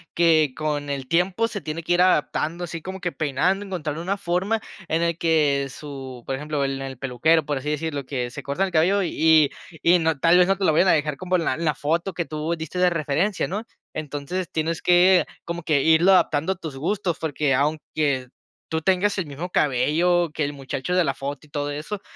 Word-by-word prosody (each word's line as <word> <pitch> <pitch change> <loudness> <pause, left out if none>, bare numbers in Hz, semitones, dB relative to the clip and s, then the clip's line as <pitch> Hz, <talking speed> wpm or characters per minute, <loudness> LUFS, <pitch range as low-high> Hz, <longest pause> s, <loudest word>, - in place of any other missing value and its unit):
que 160 -5 +4
con 150 -2 -2
el 135 -2 -4
tiempo 180 - +1
se 210 -3 -6
tiene 160 +1 -5
que 175 - +1
ir 175 - +3
adaptando 170 -1 +1
así 165 -1 -5
como 190 +2 -7
que 175 - -2
peinando, 165 +7 0
encontrar 155 -6 -4
una 190 +4 -2
forma 195 +4 -1 0.3
en 165 0 0
el 170 -1 0
que 150 -5 +2
su 135 -3 -9
por 135 - -2
ejemplo, 150 +1 -2
en 135 0 -3
el 135 -1 -6
peluquero, 140 +6 +2
por 145 -1 -1
así 145 +3 -4
decirlo, 150 -2 -3
que 125 -3 -3
se - - -7
cortan 140 +8 -1
el - - -7
cabello 180 +5 +3
y 160 -3 +4 0.3
y 175 +1 +5
no, 160 -2 +1
tal 165 +5 +5
vez 180 - +5
no 195 0 +2
te 195 - -4
lo 160 - +4
vayan 175 +5 +4
a - - +6
dejar 150 -2 0
como 185 +3 -1
en 175 - +1
la - - +1
en 165 +5 -4
la 150 - +1
foto 170 +6 -1
que 170 0 -2
tú 155 +2 -3
diste 160 +3 -5
de 180 0 +5
referencia, 165 +4 0
¿no?, 205 +5 -4 0.3
entonces 155 +4 -4
tienes 160 +1 -2
que 180 +1 +5 0.2
como 170 0 -4
que 150 -3 +2
irlo 160 +4 +5
adaptando 165 -1 +2
a - - -15
tus 160 -6 -8
gustos, 175 +3 -1
porque 150 -3 0
aunque 145 -1 0 0.4
tú 160 0 -2
tengas 190 +4 +1
el 175 - -3
mismo 150 +6 -6
cabello 165 +5 +2
que 155 - -1
el 145 - -1
muchacho 140 +4 -4
de 180 - +4
la 135 - 0
foto 140 +3 -6
y - - -28
todo 145 0 -3
eso, 155 +8 -5
160 Hz, 220 wpm, -23 LUFS, 145-180 Hz, 0.4 s, a